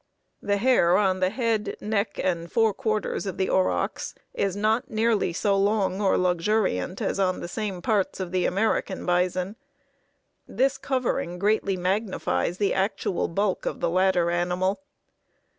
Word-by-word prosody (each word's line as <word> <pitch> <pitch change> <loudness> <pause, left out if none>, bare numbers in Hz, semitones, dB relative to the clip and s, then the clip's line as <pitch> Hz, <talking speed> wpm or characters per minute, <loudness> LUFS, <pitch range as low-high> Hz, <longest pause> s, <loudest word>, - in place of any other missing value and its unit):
The 200 0 0
hair 200 -6 +4
on 190 -2 +2
the 185 0 +2
head, 225 -1 -1
neck, 205 -1 -2
and 170 -2 -1
forequarters 215 -2 0
of 190 - -4
the 190 - 0
aurochs 190 0 0 0.2
is 195 -2 -1
not 215 +3 +1
nearly 220 -4 +1
so 200 +4 +1
long 200 -1 +1
or 195 - +3
luxuriant 180 - 0
as - - -1
on 185 -1 +1
the - - -5
same 195 -2 -4
parts 205 -3 0
of 185 -2 -4
the 185 -1 +1
American 200 0 -1
bison. 180 +3 0 0.9
This 265 +1 0
covering 250 -9 -1
greatly 200 0 +1
magnifies 185 -1 -1
the 200 -1 +1
actual 195 -1 -1
bulk 195 +2 -1
of - - -3
the 170 - 0
latter 180 -1 +2
animal. 180 +3 0
195 Hz, 145 wpm, -25 LUFS, 180-215 Hz, 0.9 s, hair